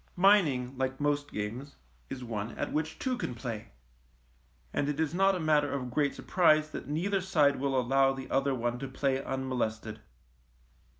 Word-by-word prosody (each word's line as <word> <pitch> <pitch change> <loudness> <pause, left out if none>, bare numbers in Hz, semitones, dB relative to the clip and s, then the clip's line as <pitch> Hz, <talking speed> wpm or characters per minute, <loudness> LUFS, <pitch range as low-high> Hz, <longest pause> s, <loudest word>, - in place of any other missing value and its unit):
Mining, 160 -10 +4
like 130 0 -1
most 145 0 0
games, 115 +7 -5 0.3
is 130 -1 -6
one 110 -1 -4
at - - -3
which 160 +1 -2
two 255 -2 -2
can 125 - -3
play, 115 -3 -5 1.1
and 145 - 0
it 150 0 -2
is 160 -1 0
not 195 +2 +3
a - - -2
matter 150 -3 +2
of 130 -3 -3
great 145 +1 +1
surprise 155 -4 +3
that - - -6
neither 185 +7 0
side 150 -7 +3
will 135 -1 +1
allow 135 +2 +3
the 135 -1 -6
other 135 0 +2
one 120 0 -2
to 135 - -4
play 135 0 -1
unmolested. 120 -5 -3
140 Hz, 170 wpm, -30 LUFS, 125-155 Hz, 1.1 s, Mining